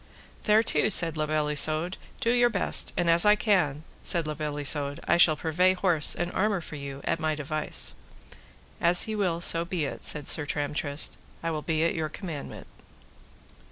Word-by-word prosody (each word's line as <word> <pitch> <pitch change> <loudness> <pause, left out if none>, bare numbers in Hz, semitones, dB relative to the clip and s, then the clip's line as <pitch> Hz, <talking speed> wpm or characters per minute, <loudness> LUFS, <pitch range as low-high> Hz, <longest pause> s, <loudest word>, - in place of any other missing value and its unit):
Thereto, 215 0 +3
said 165 -6 +4
La 155 -1 -2
Beale 150 -1 -1
Isoud, 155 +4 0 0.3
do 230 - +1
your 245 0 +3
best, 200 -5 +2
and 175 0 0
as 170 0 +6
I 210 0 +5
can, 175 -9 0 0.2
said 170 -3 +1
La 155 - -3
Beale 150 -1 -5
Isoud, 145 0 -1
I - - +3
shall 165 -2 +6
purvey 175 +5 +1
horse 180 -5 +1
and 175 0 -3
armour 205 0 0
for 160 - -9
you 140 -1 -8
at 165 - -2
my 155 -1 -1
device. 155 +1 -3 0.9
As 175 +3 +3
ye 220 - -3
will 180 -5 -1
so 165 -1 +2
be 170 -3 -3
it, - - -7
said 150 -1 -2
Sir 150 -2 +2
Tramtrist, 145 0 0 0.3
I 165 - -2
will 155 -1 -3
be 160 0 -1
at 165 - +1
your 160 -2 -3
commandment. 160 -4 -8
160 Hz, 185 wpm, -26 LUFS, 150-180 Hz, 0.9 s, as